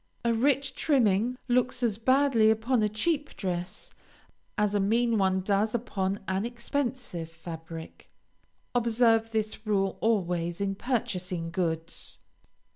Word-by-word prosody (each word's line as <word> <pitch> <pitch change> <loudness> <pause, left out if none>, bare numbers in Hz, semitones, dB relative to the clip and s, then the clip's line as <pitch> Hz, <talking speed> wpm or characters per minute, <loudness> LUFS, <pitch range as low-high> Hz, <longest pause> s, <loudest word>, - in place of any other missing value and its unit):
A 235 - +3
rich 270 +3 +2
trimming 240 -4 +2
looks 250 0 +1
as 220 -3 +1
badly 260 -2 +4
upon 220 +2 +2
a 210 - +2
cheap 290 +7 -1
dress, 180 -1 -4 0.6
as 210 -1 +2
a 205 - +2
mean 225 +3 +2
one 190 -1 +2
does 205 +3 +1
upon 200 -4 -2
an 190 +1 0
expensive 240 - -3
fabric. 165 0 -9 0.6
Observe 230 -1 +3
this 215 0 -2
rule 195 -2 +1
always 175 -6 0
in 200 -1 0
purchasing 185 -7 -2
goods. 165 -2 -2
215 Hz, 120 wpm, -28 LUFS, 190-240 Hz, 0.6 s, badly